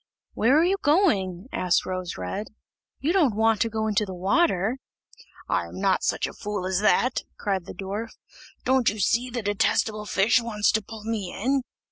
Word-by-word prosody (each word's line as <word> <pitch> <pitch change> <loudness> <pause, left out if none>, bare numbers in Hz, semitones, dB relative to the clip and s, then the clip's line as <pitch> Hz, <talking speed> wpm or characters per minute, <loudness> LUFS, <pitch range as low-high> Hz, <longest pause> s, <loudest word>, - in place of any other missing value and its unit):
"Where 255 +6 +3
are - - +4
you 380 +3 +2
going?" 210 - +2
asked 180 -1 +1
Rose 185 -1 -4
red, 95 - -4 0.5
"You 315 +5 +1
don't 300 - +3
want 220 -1 +2
to 230 - +2
go 220 0 -2
into 215 0 +1
the 190 -3 -6
water?" 200 - +1 0.7
"I - - 0
am - - -9
not - - +2
such - - 0
a - - -6
fool 205 -3 -4
as 185 0 0
that," 240 +4 +2 0.2
cried 195 -4 -2
the - - -9
dwarf, 200 +5 -4 0.6
"Don't 260 -2 +3
you 215 - -5
see 235 +6 +1
the 240 -2 -4
detestable 210 +1 0
fish 210 +6 +3
wants 215 -3 +1
to 220 - +1
pull 215 +1 -10
me 215 -5 -3
in?" 265 +6 0
215 Hz, 185 wpm, -25 LUFS, 195-245 Hz, 0.7 s, are